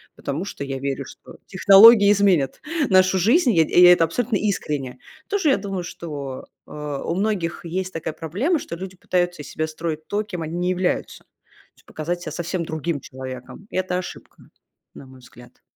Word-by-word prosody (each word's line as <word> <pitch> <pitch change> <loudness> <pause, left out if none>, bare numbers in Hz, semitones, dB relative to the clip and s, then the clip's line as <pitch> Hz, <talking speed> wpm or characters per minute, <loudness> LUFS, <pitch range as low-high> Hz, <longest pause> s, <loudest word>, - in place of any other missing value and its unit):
потому 150 +7 -4
что 170 - -6
я 135 -1 -4
верю, 140 0 -3
что - - -14
технологии 200 +2 +7
изменят 190 -9 +2 0.3
нашу 185 0 +4
жизнь, 240 - +3
и - - -1
я 165 - +6
эт - - -7
и 180 - +8
я 180 0 +10
это 170 - +3
абсолютно 220 +8 -1
искренне. 150 -11 -3 0.3
Тоже 395 -7 +1
я 270 - +4
думаю, 195 -2 -4
что, 145 -6 -7 0.2
э, - - -16
у 150 +2 -4
многих 190 -5 -2
есть 185 +2 -4
такая 160 -1 -4
проблема, 200 - -1
что - - -7
люди 185 +1 -8
пытаются 175 -3 -1
из - - -10
себя 155 0 -2
строить 155 0 -5
то, 210 +1 -1
кем 180 -5 -7
они 160 +1 -5
не 180 +1 -1
являются, 185 0 -1
то - - -45 0.5
есть - - -26
показать 175 +3 -4
себя 155 -3 -6
совсем 170 +1 -3
другим 160 -1 -3
человеком. 130 - -9
И - - -5
это 185 -1 -1
ошибка, 180 - -9 0.5
на - - -11
мой 130 0 -15
взгляд. 125 -1 -17
175 Hz, 195 wpm, -22 LUFS, 150-195 Hz, 0.5 s, я